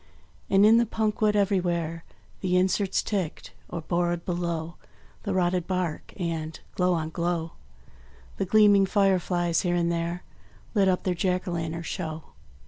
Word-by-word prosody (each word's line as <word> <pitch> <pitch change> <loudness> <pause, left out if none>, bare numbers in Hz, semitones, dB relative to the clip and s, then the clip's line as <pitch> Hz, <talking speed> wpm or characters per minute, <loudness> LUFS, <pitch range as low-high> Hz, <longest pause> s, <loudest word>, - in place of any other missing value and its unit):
And 195 +1 +5
in 225 +2 +7
the 235 0 +3
punk 215 -1 -1
wood 210 -1 +3
everywhere 175 -5 0 0.4
The 180 -1 +1
inserts 190 +1 +1
ticked, 190 -7 -3 0.2
or 170 - -4
bored 175 +1 -1
below 170 -2 -3 0.4
The 200 - -2
rotted 180 -1 +1
bark; 180 -4 -2
and, 165 -3 -3
glow 180 -1 +2
on 160 -1 -3
glow, 170 -1 -2 0.9
The 195 - 0
gleaming 205 -1 +5
fireflies 180 -4 +2
here 175 -1 0
and 170 -1 +1
there 170 +1 -2 0.5
Lit 200 -4 +3
up 185 -1 +1
their 185 - +1
Jack 180 +1 -1
o' - - -2
lantern 165 0 -3
show. 160 -3 -4
180 Hz, 150 wpm, -26 LUFS, 170-195 Hz, 0.9 s, in